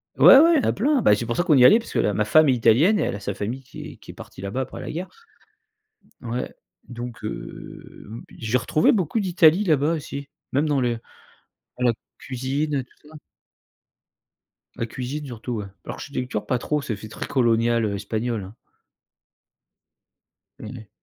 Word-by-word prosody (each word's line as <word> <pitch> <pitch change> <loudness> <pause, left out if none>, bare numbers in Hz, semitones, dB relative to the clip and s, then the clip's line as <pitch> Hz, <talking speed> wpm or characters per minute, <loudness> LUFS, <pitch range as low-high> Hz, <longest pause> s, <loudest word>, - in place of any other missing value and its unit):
Ouais 270 - +9
ouais, 335 +3 +6
il 270 - +1
y - - 0
en - - +2
a - - +1
plein. 275 +5 +1
Bah, 105 - +5
c'est 115 - -4
pour 120 - -2
ça 175 - +2
qu'on 155 - +4
y - - +5
est - - +9
allés 215 - +8
parce 235 - -10
que - - +1
ma 105 +1 0
femme 155 +7 +5
est - - +5
italienne 125 - +4
et - - +1
elle - - -2
a - - -6
sa 100 0 -4
famille 115 +6 -4
qui 130 - -11
est - - -15
qui - - -12
est - - -14
partie - - -11
là-bas 100 +7 -3
après 130 - -6
la - - -6
guerre. 180 +4 -5 1.1
Ouais 120 +1 -4 0.4
donc 120 -1 -8
heu, 105 - -8
b 115 +2 -8 0.2
j'ai 115 +2 0
retrouvé 155 - +3
beaucoup 205 - 0
d'Italie 180 -1 +4
là 160 -6 +4
bas, 145 +4 +1
aussi 140 -2 -7 0.2
même 140 +3 +2
dans 145 -3 +1
les 120 -2 +1 0.8
dans 125 - +1
la - - +4 0.3
cuisine, 135 +4 -2
heu, 135 - -1
tout 150 - -23
ça. 155 - -16 1.6
La 115 - -2
cuisine 130 +6 -5
surtout, 120 0 -6
ouais. 105 - -5 0.2
L'architecture 125 -6 -5
pas 125 - 0
trop, 150 +4 -2
ça 125 - -4
fait 110 - -9
très 110 - -6
colonial, 115 -2 +2
heu, 100 -1 -2
espagnol, 110 +2 -3
hein. 95 +4 -11 2.0
Ouais. 110 -1 -9
125 Hz, 200 wpm, -23 LUFS, 115-150 Hz, 2.0 s, Ouais